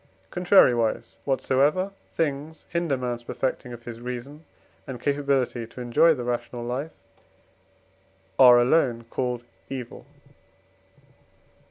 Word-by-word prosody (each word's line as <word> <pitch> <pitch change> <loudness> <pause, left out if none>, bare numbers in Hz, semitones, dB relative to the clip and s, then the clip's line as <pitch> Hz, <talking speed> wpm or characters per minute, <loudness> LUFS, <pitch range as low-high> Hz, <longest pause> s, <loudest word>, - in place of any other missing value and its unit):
Contrariwise, 125 - +3
whatsoever 145 +7 +1 0.2
things 150 0 -2
hinder 170 -5 0
man's 120 -1 -4
perfecting 125 0 -3
of 120 -1 -9
his 120 -1 -8
reason, 125 +5 -7 0.4
and 130 -2 -6
capability 135 -4 0
to 115 - -12
enjoy 125 +7 +4
the 130 -6 -1
rational 120 0 -3
life, 130 +6 -3 1.5
are 125 -2 +9
alone 120 -2 +2
called 125 -2 -2 0.3
evil. 125 -3 -7
130 Hz, 105 wpm, -25 LUFS, 120-145 Hz, 1.5 s, are